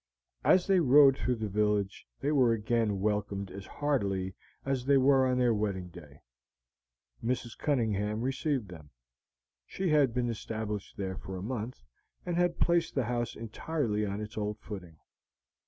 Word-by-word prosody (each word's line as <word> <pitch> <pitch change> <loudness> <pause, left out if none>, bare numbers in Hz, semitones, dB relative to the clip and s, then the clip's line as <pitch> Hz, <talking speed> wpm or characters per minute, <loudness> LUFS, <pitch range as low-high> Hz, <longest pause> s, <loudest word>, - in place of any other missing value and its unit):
As 185 -1 +5
they 195 -2 +4
rode 140 -2 +7
through 125 -2 0
the 110 -2 -3
village 105 -1 0
they 145 - +1
were 130 -6 +4
again 110 -2 0
welcomed 100 -2 -1
as 100 +1 -8
heartily 100 -11 -1 0.3
as 135 -2 -1
they 140 -1 +6
were 135 0 +5
on 125 0 +1
their 125 -2 +3
wedding 100 -4 -2
day. 75 -6 -14 1.0
Mrs. 120 -1 -2
Cunningham 110 -6 0
received 130 -3 -1
them; 80 -4 -11 0.7
she 185 - -3
had 145 -5 +4
been 120 0 0
established 110 -2 -5
there 95 -2 -3
for 95 +1 -7
a 90 - -6
month, 120 - -5 0.4
and 175 -1 -1
had 175 -1 +1
placed 170 -1 +2
the 135 -4 +1
house 120 0 -2
entirely 115 -1 -2
on 100 0 -2
its 105 +1 -6
old 105 0 -2
footing. 90 -7 -9
115 Hz, 155 wpm, -30 LUFS, 100-135 Hz, 1.0 s, rode